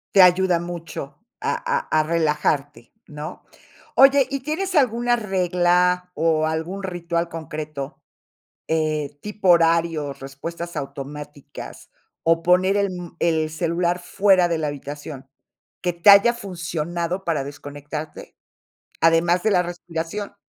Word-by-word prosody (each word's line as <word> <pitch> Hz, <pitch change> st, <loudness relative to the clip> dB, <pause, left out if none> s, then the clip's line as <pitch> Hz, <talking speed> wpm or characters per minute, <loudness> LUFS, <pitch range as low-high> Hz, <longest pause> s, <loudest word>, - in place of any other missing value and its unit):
Te 195 Hz, -, +9 dB
ayuda 180 Hz, -1 st, +5 dB
mucho 170 Hz, -5 st, -7 dB, 0.3 s
a -, -, 0 dB
a 485 Hz, 0 st, -1 dB, 0.2 s
a -, -, +3 dB
relajarte, 150 Hz, -3 st, -1 dB, 0.2 s
¿no? 150 Hz, 0 st, -8 dB, 0.5 s
Oye, 270 Hz, 0 st, +6 dB
¿y 275 Hz, -1 st, -3 dB
tienes 360 Hz, +7 st, -3 dB
alguna 240 Hz, -3 st, +3 dB
regla, 180 Hz, -3 st, +1 dB
o, 160 Hz, -1 st, +1 dB
algún 160 Hz, +5 st, -3 dB
ritual 170 Hz, -2 st, -2 dB
concreto? 155 Hz, -3 st, -6 dB, 0.7 s
Eh, 155 Hz, -2 st, -1 dB
¿tipo 210 Hz, -2 st, -3 dB
horarios, 165 Hz, -4 st, +2 dB
respuestas 165 Hz, +6 st, -7 dB
automáticas, 145 Hz, +1 st, -8 dB, 0.3 s
o, 165 Hz, 0 st, +2 dB
poner 185 Hz, +2 st, +4 dB
el, 200 Hz, -1 st, +1 dB
mm, 180 Hz, -2 st, -8 dB
el 160 Hz, -2 st, +1 dB
celular 170 Hz, +2 st, 0 dB
fuera 185 Hz, 0 st, +3 dB
de 170 Hz, -1 st, -1 dB
la 155 Hz, -1 st, -1 dB
habitación, 145 Hz, -1 st, -7 dB, 0.5 s
que 175 Hz, -, 0 dB
te 170 Hz, +4 st, +6 dB
haya 200 Hz, +4 st, +7 dB
funcionado 175 Hz, -2 st, -4 dB
para 165 Hz, -4 st, 0 dB
desconectarte, 145 Hz, +2 st, -8 dB, 0.7 s
además 170 Hz, +2 st, +4 dB
de 220 Hz, -, +2 dB
la 180 Hz, -3 st, +4 dB
respiración? 175 Hz, +3 st, -5 dB
170 Hz, 125 wpm, -22 LUFS, 155-185 Hz, 0.7 s, Te